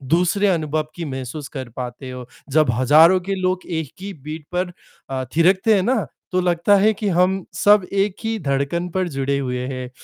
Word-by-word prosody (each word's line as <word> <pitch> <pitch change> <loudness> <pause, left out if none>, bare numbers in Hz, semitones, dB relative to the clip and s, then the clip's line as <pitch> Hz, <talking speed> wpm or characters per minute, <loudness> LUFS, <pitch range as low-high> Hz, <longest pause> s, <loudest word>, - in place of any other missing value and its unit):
दूसरे 180 +4 +2
अनुभव 155 -4 0
की 170 - -5
महसूस 135 +1 -5
कर 130 -3 -7
पाते 125 +1 -6
हो। 125 -1 -7 0.2
जब 155 -3 +3
हजारों 155 +9 +5
के 195 - 0
लोग 185 0 -1
एक 160 -5 -4
ही 200 0 -6
बीट 150 +1 -8
पर 180 0 -1 0.4
अ, 130 -1 -2
थिरकते 190 +6 +4
हैं 195 - +3
ना 235 0 +1 0.3
तो 185 - +1
लगता 175 +3 +3
है 210 +3 +4
कि 210 0 -4
हम 185 +1 +2
सब 205 -1 +4
एक 200 -1 +1
ही 225 0 -1
धड़कन 140 +6 0
पर 185 +1 0
जुड़े 140 -1 -1
हुए 125 -2 -2
हैं। 130 -2 -5
165 Hz, 190 wpm, -21 LUFS, 135-190 Hz, 0.4 s, हजारों